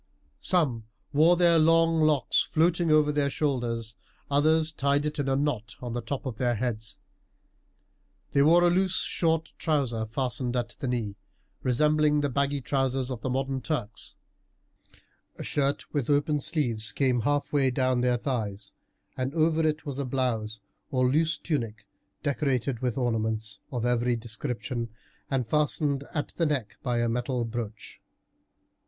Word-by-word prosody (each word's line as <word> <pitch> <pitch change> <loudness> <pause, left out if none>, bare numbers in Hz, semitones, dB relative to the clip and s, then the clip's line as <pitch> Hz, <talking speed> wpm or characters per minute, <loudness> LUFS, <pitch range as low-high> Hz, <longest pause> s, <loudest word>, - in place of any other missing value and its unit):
Some 135 - +1 0.3
wore 165 +4 +5
their 170 -2 +5
long 165 0 +4
locks 150 -5 +3
floating 170 +1 +2
over 155 -1 +5
their 145 -1 +1
shoulders, 120 -6 -2 0.4
others 155 +2 +3
tied 140 0 +1
it 150 0 -3
in 140 -1 0
a 135 - +2
knot 135 -6 -1
on 120 -2 -5
the 120 - -2
top 130 +5 -4
of 125 -5 -4
their 120 0 +1
heads. 110 -3 -3 1.3
They 140 - +3
wore 170 +4 +6
a 175 - +5
loose 185 +1 +2
short 160 -3 0
trouser 130 -8 0
fastened 125 +1 -2
at 120 -1 -1
the 135 - -3
knee, 115 -5 -2 0.4
resembling 150 +3 +3
the 145 -1 -1
baggy 140 +1 0
trousers 135 0 0
of 120 -3 -5
the 130 - -2
modern 135 +1 -1
Turks. 120 -7 -4 1.2
A - - -7
shirt 140 0 -1
with 145 -4 -1
open 145 +1 +2
sleeves 120 -8 0
came 130 -3 +1
halfway 145 +1 +1
down 130 -1 +1
their 125 0 +2
thighs, 110 -6 -3 0.4
and 130 +4 -3
over 160 0 +3
it 155 0 -2
was 140 -2 -4
a 140 - -1
blouse 115 -5 -1 0.3
or 130 -3 +2
loose 160 +2 +2
tunic 115 -9 -3 0.4
decorated 135 -4 0
with 125 -1 -2
ornaments 110 -4 -1
of 120 -2 -2
every 120 0 +2
description, 120 +1 -4 0.4
and 130 -4 0
fastened 145 -1 0
at 150 - -1
the 165 - +2
neck 135 -8 -2
by 120 -3 0
a 120 - +1
metal 120 +1 -1
brooch. 115 -2 -6
135 Hz, 150 wpm, -27 LUFS, 120-150 Hz, 1.3 s, wore